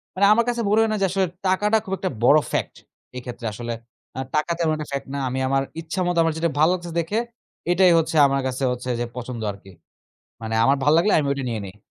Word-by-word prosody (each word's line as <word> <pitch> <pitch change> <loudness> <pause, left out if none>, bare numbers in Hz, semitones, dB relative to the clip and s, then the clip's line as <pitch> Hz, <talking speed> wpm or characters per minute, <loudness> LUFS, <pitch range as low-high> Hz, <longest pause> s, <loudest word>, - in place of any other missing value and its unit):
মানে 195 +2 +3
আমার 235 +1 +2
কাছে 240 -1 -1
মনে 210 +2 +4
হয় 225 - +2
না - - 0
যে - - +4
আসলে 190 0 +1 0.2
টাকাটা 205 +4 +3
খুব 190 - -4
একটা 185 - -2
বড় 145 +5 +7
ফ্যাক্ট, - - -2 0.4
এক্ষেত্রে 120 -1 -7
আসলে। 120 +2 -4 0.4
আ - - -2 0.2
টাকা 150 +3 +1
তেমন 165 -2 +1
একটা 150 -1 -6
ফ্যাক্ট 140 0 -4
না। - - -2
আমি 130 +1 -3
আমার 135 0 +1 0.2
ইচ্ছামত 175 +2 -2
আমার 165 - +1
যেটা 165 +1 +1
ভালো 160 +3 +5
লাগছে 175 -1 -5
দেখে, 185 +7 -1 0.5
এটাই 180 0 +5
হচ্ছে 160 0 -2
আমার 135 0 0
কাছে 130 +1 -3
হচ্ছে 125 0 -5
যে 120 - -1
পছন্দ 125 -1 -5
আরকি। 100 -1 -14 0.7
মানে 110 0 -3
আমার 135 +3 +4
ভাল 145 - +4
লাগলে 205 +5 +3
আমি 150 - 0
ওটা 140 -1 -3
নিয়ে 115 -2 -3
নেই। 95 +1 -11
155 Hz, 225 wpm, -23 LUFS, 125-185 Hz, 0.7 s, বড়